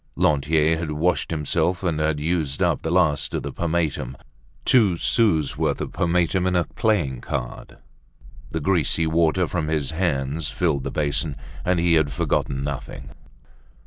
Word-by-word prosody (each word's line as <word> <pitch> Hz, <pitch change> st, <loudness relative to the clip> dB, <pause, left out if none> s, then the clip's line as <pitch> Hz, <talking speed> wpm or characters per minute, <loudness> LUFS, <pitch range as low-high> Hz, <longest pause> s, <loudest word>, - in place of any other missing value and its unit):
Lantier 75 Hz, +2 st, +2 dB
had 85 Hz, -2 st, -3 dB
washed 85 Hz, +4 st, 0 dB
himself 80 Hz, +4 st, 0 dB
and 85 Hz, -4 st, 0 dB
had 75 Hz, -1 st, 0 dB
used 75 Hz, -3 st, -1 dB
up -, -, +1 dB
the 80 Hz, -, -3 dB
last 85 Hz, -4 st, +2 dB
of -, -, -2 dB
the -, -, -5 dB
pomatum—two 85 Hz, -, -1 dB
sous' 85 Hz, -, +1 dB
worth -, -, 0 dB
of -, -, -4 dB
pomatum 90 Hz, +1 st, +1 dB
in 90 Hz, -, +1 dB
a 90 Hz, -, +3 dB
playing 85 Hz, -, -1 dB
card; -, -, -5 dB, 0.7 s
the 80 Hz, -, -3 dB
greasy 80 Hz, 0 st, +1 dB
water 80 Hz, +2 st, +2 dB
from 80 Hz, -3 st, -2 dB
his 75 Hz, -3 st, -1 dB
hands 75 Hz, -3 st, -1 dB
filled 70 Hz, -1 st, 0 dB
the -, -, -2 dB
basin. 75 Hz, 0 st, -1 dB, 0.3 s
And 90 Hz, -1 st, +1 dB
he 85 Hz, 0 st, +3 dB
had 80 Hz, -3 st, +3 dB
forgotten 65 Hz, +1 st, -1 dB
nothing. 70 Hz, -1 st, -6 dB
80 Hz, 150 wpm, -23 LUFS, 75-85 Hz, 0.7 s, a